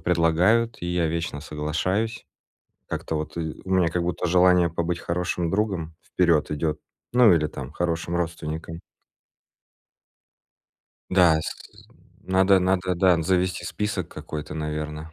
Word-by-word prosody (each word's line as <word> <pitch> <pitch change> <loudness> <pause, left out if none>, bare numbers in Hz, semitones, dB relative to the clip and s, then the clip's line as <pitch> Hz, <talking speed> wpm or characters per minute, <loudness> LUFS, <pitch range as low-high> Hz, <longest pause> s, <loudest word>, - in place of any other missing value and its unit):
предлагают, 90 +8 +2
и 85 - -2
я 90 -1 +1
вечно 80 -3 -3
соглашаюсь. 90 +10 -2 0.6
Как-то - - -4
вот 75 +2 -5
ы 80 -2 -4
у 95 - -8
меня 95 -3 +3
как 85 +1 -1
будто 90 +1 -2
желание 90 0 +4
побыть 85 +1 -2
хорошим 85 -1 -2
другом 95 -5 -1
вперед 85 -4 +1
идет, 75 0 -1 0.3
ну, 125 -5 +6
или 75 -3 +3
там, 70 -1 -8
хорошим 85 0 -2
родственником. 80 -1 -4 2.3
Да 85 -4 +5
с - - -3 0.7
надо 95 0 +4
надо, 90 0 +1
да, 90 -1 +3
завести 90 +1 0
список 100 -5 -3
какой-то, 75 0 -7
наверно. 75 +1 -5
85 Hz, 125 wpm, -24 LUFS, 80-90 Hz, 2.3 s, ну